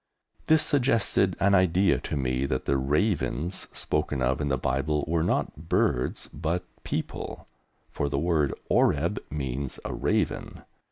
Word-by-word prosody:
This 160 -1 +6
suggested 115 -8 +2
an 100 +1 +3
idea 95 0 +4
to - - -4
me 65 0 0
that 65 -1 -2
the 70 - +1
"ravens" 80 - 0
spoken 70 - -1
of 65 +3 +1
in 75 - -1
the 65 -1 +1
Bible 70 +4 0
were 80 0 +1
not 80 -1 -1
birds 60 - +1
but 85 +4 -2 0.2
people, - - -4 0.4
for 70 - -1
the 70 - -1
word 75 -2 +1 0.2
"Oreb" - - +2
means 70 -2 -4
a - - -3
raven. - - -1
75 Hz, 145 wpm, -27 LUFS, 70-90 Hz, 0.4 s, This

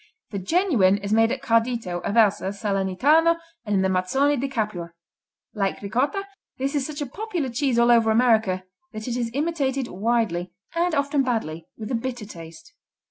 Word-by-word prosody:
The 200 - -3
genuine 215 - +3
is 205 +1 -3
made 225 +1 +4
at 260 0 -3
Cardito, 230 -7 0
Aversa, 205 -3 +2
Salernitano 210 - +2 0.3
and 205 - +1
in 190 - +3
the - - +3
Mazzoni 190 +11 +2
di 275 +1 -2
Capua. 210 -10 -3 0.6
Like 195 -3 -1
Ricotta, 275 - 0 0.3
this 270 +2 -2
is 280 -3 0
such 305 -1 -6
a - - -1
popular 345 - -3
cheese 250 0 0
all 235 0 +5
over 230 -2 +5
America 220 -5 +3 0.3
that 215 +1 -6
it 240 - -2
is 240 -2 -1
imitated 280 -4 0
widely, 190 -4 -1 0.2
and 340 0 +1
often 280 0 +1
badly, 175 -11 -2
with 215 +1 -6
a - - -1
bitter 240 -1 -3
taste. 165 -4 -12
230 Hz, 170 wpm, -24 LUFS, 195-275 Hz, 0.6 s, all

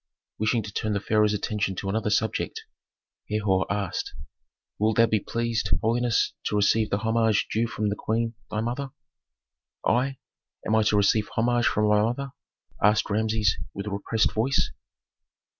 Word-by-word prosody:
Wishing 110 +2 +1
to 100 -1 -8
turn 110 0 -1
the 100 - 0
pharaoh's 105 0 +2
attention 105 -1 -2
to 100 - -5
another 105 +2 0
subject, 110 0 -1 0.7
Herhor 105 -3 +1
asked, 100 -3 -3 0.6
"Wilt 110 +1 +1
thou 115 - +7
be 110 -1 +1
pleased, 115 -1 -2
holiness, 115 +1 +1
to - - -1
receive 105 +1 +3
the 100 - +1
homage 110 0 +1
due 115 +2 +1
from 105 -2 -2
the 100 - -1
queen, 115 +2 -1 0.2
thy 105 - -2
mother?" 125 +4 -3 1.0
"I? 130 +3 +1 0.5
Am 110 - 0
I 110 - +4
to 105 -1 +2
receive 105 +1 +2
homage 120 +1 +2
from 105 0 +2
my 105 0 +4
mother?" 125 +5 -1 0.5
asked 105 +1 +3
Rameses, 110 -2 +1 0.2
with 100 - -5
repressed 105 +2 0
voice. 125 +5 +1
110 Hz, 155 wpm, -26 LUFS, 105-115 Hz, 1.0 s, thou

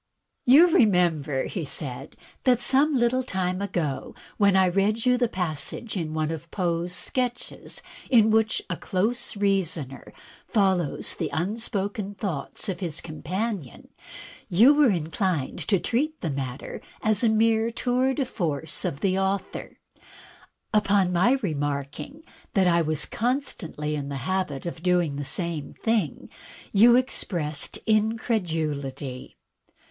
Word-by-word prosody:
"You 285 +7 +9
remember," 170 - +3
said 140 -5 -4
he, - - -25 0.2
"that 250 -3 +4
some 275 +3 +4
Uttle 250 +2 +2
time 185 -5 -2
ago, 170 -9 -3 0.2
when 200 -2 +4
I 190 0 +5
read 200 +5 +1
you 250 0 +5
the 245 -1 +2
passage 180 - -3
in 160 -4 -3
one 155 0 0
of 165 0 -6
Poe's 175 -2 -1
sketches, 245 +5 -3 0.3
in 220 -4 +5
which 220 0 +2
a 180 - -3
close 220 +4 -1
reasoner 180 -9 -1 0.4
follows 190 - +1
the - - -3
unspoken 200 +3 -2
thoughts 185 -2 -4
of 190 - -3
his 170 -5 -3
companion, 180 - -4 0.6
you 230 +11 +7
were 295 -3 +5
inclined 170 - -1
to 195 -4 +3
treat 300 - -1
the 165 - -2
matter 135 -1 -5 0.2
as 215 +1 +2
a 230 - +5
mere 220 +1 +3
tour 255 +3 0
de 275 - 0
force 160 - -3
of 140 - -3
the 190 -1 +1
author. 195 0 -3 1.1
On 195 -3 +3
my 185 +9 +4
remarking 145 - -3 0.3
that 190 -2 +4
I 170 -1 +4
was 155 -1 0
constantly 220 - -2
in 140 -1 -4
the 140 - -4
habit 185 -7 -2
of 170 -1 -5
doing 175 -4 +2
the 145 - -3
same 165 0 -3
thing 220 - -1 0.5
you 235 +4 +7
expressed 170 - -1
incredulity." 160 - -1
190 Hz, 130 wpm, -25 LUFS, 155-225 Hz, 1.1 s, You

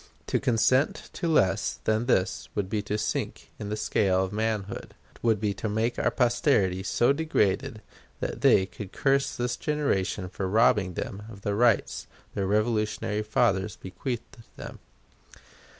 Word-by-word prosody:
To - - 0
consent 130 +2 +2
to 170 - -3
less 100 - +2
than 110 +2 +1
this 95 -7 +1
would 100 -2 -2
be 105 - 0
to 105 +1 -2
sink 105 - -3
in 105 - -5
the 105 - -2
scale 95 -3 +2
of 95 +1 -4
manhood; 105 -2 -3 0.3
would 110 -3 +2
be 105 -1 0
to 105 +3 -4
make 110 +3 0
our - - +2
posterity 120 -7 +2
so 120 +7 +2
degraded 110 -8 0 0.4
that - - -4
they 95 - +5
would 100 -3 -6
curse 135 0 +1
this 120 0 -1
generation 105 -11 -1
for 95 +1 -4
robbing 105 -4 +3
them 100 - -4
of 100 -3 -11
the 100 - -1
rights 115 0 +2 0.3
their 100 -1 -1
Revolutionary 105 0 0
fathers 100 -2 +1
bequeathed 120 +7 -6 0.2
them.... - - -8
105 Hz, 150 wpm, -27 LUFS, 100-120 Hz, 0.4 s, they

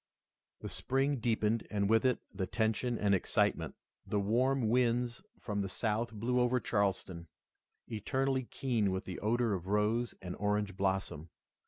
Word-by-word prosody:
The - - -5
spring 135 +2 0
deepened 110 -1 0
and 100 -2 0
with 115 +3 +3
it 125 -1 +3 0.2
the 95 -1 -2
tension 110 +3 0
and 100 -1 +2
excitement. 95 - +1 0.3
The 105 - -1
warm 120 +5 +2
winds 120 +2 +1 0.2
from 105 -2 -2
the 95 - -2
South 115 +3 -1
blew 115 +4 0
over 125 +1 +3
Charleston, 95 -6 -1 0.6
eternally 130 +4 -1
keen 115 -6 0
with 95 0 -2
the 90 - -5
odor 115 +1 +1
of 95 -1 -4
rose 105 +4 +1
and 90 -1 -6
orange 105 -1 0
blossom. 95 -5 -1
110 Hz, 150 wpm, -33 LUFS, 100-120 Hz, 0.6 s, with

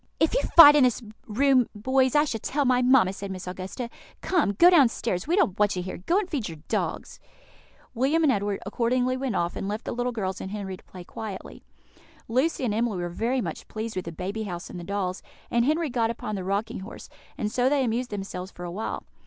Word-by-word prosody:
"If 320 - +2
you - - +2 0.2
fight 295 -3 +11
in 290 - +6
this 250 -1 +2 0.2
room, 255 +2 +3
boys, 260 +5 +1
I 295 - +6
shall 225 -6 -3
tell 285 +6 -1
my 250 -1 +3
mamma," 245 -7 +4
said 200 0 -6
Miss 185 -1 -6
Augusta. 185 +6 -5 0.3
"Come, 330 - +1
go 345 - +6
downstairs; 230 - +2
we 340 - +2
don't 300 - +1
want 205 -1 +3
you 180 - -3
here. 185 - -6
Go 335 - +1
and 410 -2 0
feed 275 - -3
your 160 - -8
dogs." - - -3 0.7
William 275 +7 +2
and 295 - +5
Edward 205 -3 -1
accordingly 250 +5 0
went 260 -4 -2
off, 170 -1 -1
and 195 - -4
left 210 +2 -4
the - - -3
little 245 +1 -1
girls 190 -5 -3
and 190 - -5
Henry 195 -2 -5
to - - -18
play 180 -1 -11
quietly. 205 +2 -8 0.7
Lucy 260 +4 +1
and 215 - 0
Emily 225 -2 0
were 175 0 -3
very 235 +8 -1
much - - -6
pleased 220 0 -5
with 185 - -3
the 170 - -5
baby 190 +6 -4
house 175 -3 -6
and 180 - -7
the - - -7
dolls, 190 0 -3 0.3
and 235 0 +2
Henry 310 0 +1
got 230 -2 +1
upon 220 -2 -4
the 195 -2 -3
rocking 205 +5 -2
horse; 190 +4 -9 0.3
and 210 - -2
so 250 +2 +2
they 280 -1 +2
amused 245 +1 -1
themselves 195 -2 -5
for 175 - -11
a 175 - -5
while. 215 +5 -4
225 Hz, 225 wpm, -26 LUFS, 195-260 Hz, 0.7 s, fight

